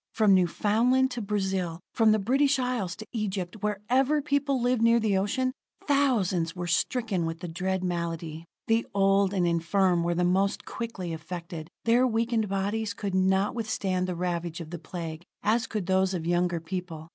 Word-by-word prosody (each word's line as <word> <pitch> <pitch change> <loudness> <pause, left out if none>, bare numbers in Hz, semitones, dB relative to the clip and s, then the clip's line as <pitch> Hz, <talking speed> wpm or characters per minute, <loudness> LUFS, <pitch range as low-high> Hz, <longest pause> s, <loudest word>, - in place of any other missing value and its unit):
From 215 -3 +5
Newfoundland 220 +8 +3
to 245 -1 -4
Brazil; 190 -5 -1
from 225 -2 +4
the 215 - +4
British 270 +7 +2
Isles 250 -8 -1
to 220 - -9
Egypt, 200 -4 -3
wherever 245 +8 +1
people 285 -2 0
lived 245 -1 +1
near 230 +1 +5
the 215 -3 +1
ocean, 255 +7 0 0.3
thousands 205 - +2
were 175 -1 -4
stricken 195 +2 0
with 165 +1 -5
the 175 - -4
dread 185 +2 -2
malady. 165 -2 -3 0.2
The 225 0 +1
old 195 0 +3
and 185 -3 +1
infirm 175 +2 +2
were 170 0 0
the 180 - +1
most 190 +3 +1
quickly 195 -8 -5
affected; 165 0 -7 0.2
their 240 +3 +4
weakened 225 -2 0
bodies 200 +2 -1
could 200 -2 -4
not 190 +1 +2
withstand 195 -5 -1
the 180 - -2
ravage 170 -1 -2
of 165 -1 -8
the 175 - -5
Plague 165 0 -6 0.2
as 225 +2 +2
could 210 -4 -3
those 190 0 +2
of 165 -2 -4
younger 175 0 +1
people. 165 -2 -6
195 Hz, 170 wpm, -27 LUFS, 175-225 Hz, 0.3 s, From